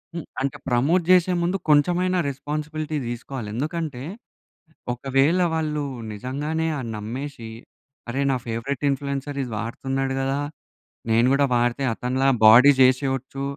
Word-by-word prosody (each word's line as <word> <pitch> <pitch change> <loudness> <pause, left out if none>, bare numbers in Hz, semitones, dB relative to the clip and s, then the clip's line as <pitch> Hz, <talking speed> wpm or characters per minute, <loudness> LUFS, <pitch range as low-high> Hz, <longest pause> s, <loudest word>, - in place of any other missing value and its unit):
హ్మ్, 170 - -5 0.2
అంటే 135 0 -2
ప్రమోట్ 145 +9 +2
చేసే 185 0 +5
ముందు 180 +3 0
కొంచెమైనా 180 +5 +3
రెస్పాన్సిబిలిటీ 150 +2 -4
తీసుకోవాలి. 120 -2 -6
ఎందుకంటే 150 -1 -3 0.9
ఒకవేళ 135 +7 +2
వాళ్ళు 155 -2 -1 0.3
నిజంగానే 145 +9 -3
ఆ - - -4
నమ్మేసి 115 +3 -6 0.6
అరేయ్! 140 +3 0
నా - - +1
ఫేవరెట్ 125 +5 -3
ఇన్‌ఫ్లుయెన్సర్‌ 140 +1 -3
ఇది 125 - -7
వాడుతున్నాడు 135 +3 -3
కదా! 135 +1 -1 0.7
నేను 115 +2 +4
కూడా 140 0 +3
వాడితే 120 +3 +1
అతనిలా 130 +3 -1 0.2
బాడీ 125 +6 +9
చేసేయచ్చు 135 +1 +1
135 Hz, 120 wpm, -23 LUFS, 125-150 Hz, 0.9 s, బాడీ